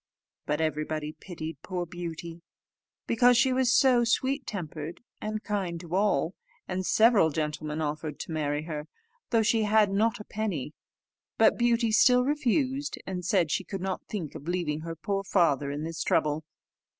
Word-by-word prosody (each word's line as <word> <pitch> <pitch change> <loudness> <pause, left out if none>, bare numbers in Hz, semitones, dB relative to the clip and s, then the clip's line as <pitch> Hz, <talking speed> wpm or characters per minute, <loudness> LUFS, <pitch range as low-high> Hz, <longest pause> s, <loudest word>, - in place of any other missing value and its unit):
But 150 +1 0
everybody 155 -1 -2
pitied 160 -4 -8
poor 180 -2 -3
Beauty, 170 -1 -7 0.6
because 245 +1 +4
she 260 +1 +4
was 255 -1 +2
so 255 -2 +5
sweet 265 +3 0
tempered 160 -4 -5 0.2
and 215 0 -3
kind 190 -5 -2
to 170 0 -9
all, 185 -4 +2 0.3
and 185 0 -2
several 215 -4 +5
gentlemen 150 0 -3
offered 150 0 -3
to - - -7
marry 150 -1 -1
her, 155 -2 -5 0.4
though 230 -2 +3
she 225 +1 +2
had 210 -1 +4
not 220 +4 +1
a - - -7
penny; 195 -11 -3 0.6
but 220 - +5
Beauty 235 -1 +2
still 250 +3 +5
refused, 275 0 0
and 180 -2 -4
said 175 -3 +2
she - - 0
could 195 - -5
not 190 0 -2
think 175 -9 -4
of 145 - -9
leaving 170 -4 -1
her 165 +1 -6
poor 195 +4 -2
father 155 -8 +2
in 145 +2 -4
this 165 0 -4
trouble. 155 -1 +1
180 Hz, 160 wpm, -28 LUFS, 155-220 Hz, 0.6 s, so